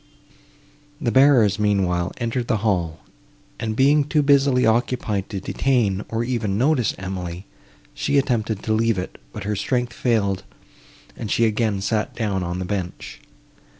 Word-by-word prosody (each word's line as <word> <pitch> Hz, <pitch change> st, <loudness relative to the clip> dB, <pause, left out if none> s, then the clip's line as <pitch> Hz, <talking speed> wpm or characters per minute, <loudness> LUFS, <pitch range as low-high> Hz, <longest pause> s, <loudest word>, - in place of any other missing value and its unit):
The 125 Hz, -7 st, 0 dB
bearers, 130 Hz, -7 st, +5 dB
meanwhile, 95 Hz, -4 st, +1 dB
entered 120 Hz, 0 st, -2 dB
the 110 Hz, -, +1 dB
hall, 85 Hz, -6 st, 0 dB, 0.6 s
and, 110 Hz, -1 st, -2 dB
being 145 Hz, +4 st, +4 dB
too 150 Hz, +1 st, +1 dB
busily 140 Hz, -2 st, +4 dB
occupied 110 Hz, -3 st, 0 dB
to 100 Hz, -, -4 dB
detain, 105 Hz, -3 st, 0 dB
or 115 Hz, +1 st, -1 dB
even 115 Hz, -5 st, -1 dB
notice 130 Hz, -1 st, +2 dB
Emily, 90 Hz, -1 st, -5 dB, 0.5 s
she 140 Hz, -, 0 dB
attempted 115 Hz, -6 st, 0 dB
to 110 Hz, -, 0 dB
leave 115 Hz, -1 st, +2 dB
it, 90 Hz, -, -5 dB
but 105 Hz, -, -7 dB
her 105 Hz, +1 st, -2 dB
strength 120 Hz, +4 st, -1 dB
failed, 100 Hz, -6 st, 0 dB, 0.7 s
and 110 Hz, -, -6 dB
she 115 Hz, -, +3 dB
again 110 Hz, -2 st, 0 dB
sat 105 Hz, +2 st, -1 dB
down 105 Hz, -5 st, -1 dB
on 85 Hz, 0 st, -3 dB
the 90 Hz, -, -3 dB
bench. 95 Hz, -2 st, -5 dB
110 Hz, 150 wpm, -22 LUFS, 95-125 Hz, 0.7 s, bearers